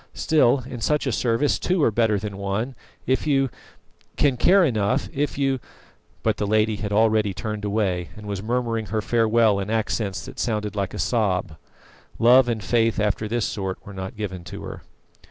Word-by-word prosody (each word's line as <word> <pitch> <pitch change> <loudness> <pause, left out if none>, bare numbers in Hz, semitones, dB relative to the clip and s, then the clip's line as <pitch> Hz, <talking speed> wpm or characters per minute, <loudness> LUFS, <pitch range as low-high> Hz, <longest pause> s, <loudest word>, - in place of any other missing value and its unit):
Still, 140 -5 +3
in 125 -3 -7
such 150 +6 +1
a 130 - 0
service 120 +5 +1
two 180 -3 +1
are 115 - +4
better 110 -1 +2
than 100 -1 -5
one. 100 +6 -2 0.3
If 130 +4 0
you 135 -3 +2 0.6
can 140 -3 +2
care 185 +8 +5
enough 120 0 0
if 145 +1 -1
you 135 -2 +1 0.3
" - - -36
But - - +1
the 105 - -1
lady 110 0 +2
had 105 -1 -4
already 110 -2 +2
turned 105 -1 -4
away, 100 -4 -1
and 105 - -10
was 100 -2 -4
murmuring 115 -1 -1
her 110 0 -2
farewell 115 -2 +3
in 100 +1 -4
accents 110 -3 -1
that - - -10
sounded 105 -3 -2
like 100 -2 -2
a - - -5
sob. 95 -8 0 0.6
Love 125 +2 +6
and 110 -3 -2
faith 115 -1 +1
after 105 +1 0
this 115 0 0
sort 95 -3 -3
were 100 - -9
not 95 +2 -6
given 95 -5 -5
to - - -8
her. - - -7
110 Hz, 190 wpm, -23 LUFS, 100-120 Hz, 0.6 s, Love